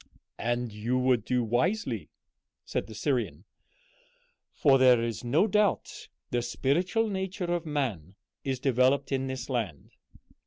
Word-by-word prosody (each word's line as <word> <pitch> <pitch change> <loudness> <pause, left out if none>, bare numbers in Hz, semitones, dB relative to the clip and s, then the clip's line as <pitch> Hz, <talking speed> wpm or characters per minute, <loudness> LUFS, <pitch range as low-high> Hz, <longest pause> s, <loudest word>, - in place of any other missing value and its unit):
"And 120 -1 -1
you 115 +4 -1
would 125 -3 +2
do 125 0 +1
wisely," 160 - 0 0.6
said - - -3
the - - -10
Syrian, - - -1 1.1
"for 135 -3 +4
there 125 -2 +6
is 115 0 -3
no 140 +11 +3
doubt 210 -1 0 0.2
the 120 - +1
spiritual 175 - 0
nature 190 -3 -2
of 170 -2 -2
man 110 - -2 0.3
is 135 -2 -2
developed 135 +2 +2
in 135 -1 0
this 130 -1 -4
land." 110 - -3
130 Hz, 130 wpm, -28 LUFS, 120-160 Hz, 1.1 s, there